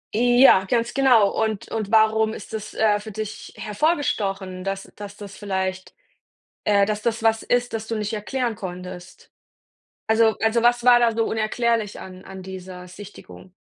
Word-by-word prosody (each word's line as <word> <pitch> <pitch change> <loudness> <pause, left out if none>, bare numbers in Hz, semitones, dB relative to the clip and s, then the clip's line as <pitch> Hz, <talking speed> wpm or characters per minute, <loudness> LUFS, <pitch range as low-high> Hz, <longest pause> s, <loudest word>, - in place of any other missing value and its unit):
Ja, 245 -4 +5
ganz 235 +3 0
genau. 245 -7 +4
Und 220 -2 -2
und 215 -2 -4
warum 220 0 +3
ist - - -11
das, 215 0 -6
äh, 210 -2 +2
für 215 +1 -9
dich 215 0 -7
hervorgestochen, 200 - -1
dass 195 0 -5
dass 205 0 -9
das 200 -2 -10
vielleicht, 190 -2 -4 0.7
äh, 200 -1 +3
dass 210 0 -2
das 225 0 -2
was 225 0 +2
ist, 245 0 0
das 220 0 -5
du 230 - -2
nicht 210 +1 -3
erklären 235 +3 -2
konntest? 180 -2 -9 0.8
Also 220 0 +3
also 225 +1 +2
was 240 0 +3
war 245 -1 +7
da 235 -1 +3
so 225 - +2
unerklärlich 225 -1 -1
an 185 0 -11
an 190 -1 -9
dieser 185 -1 -9
Sichtung, 185 -1 -13
215 Hz, 160 wpm, -23 LUFS, 195-230 Hz, 0.8 s, war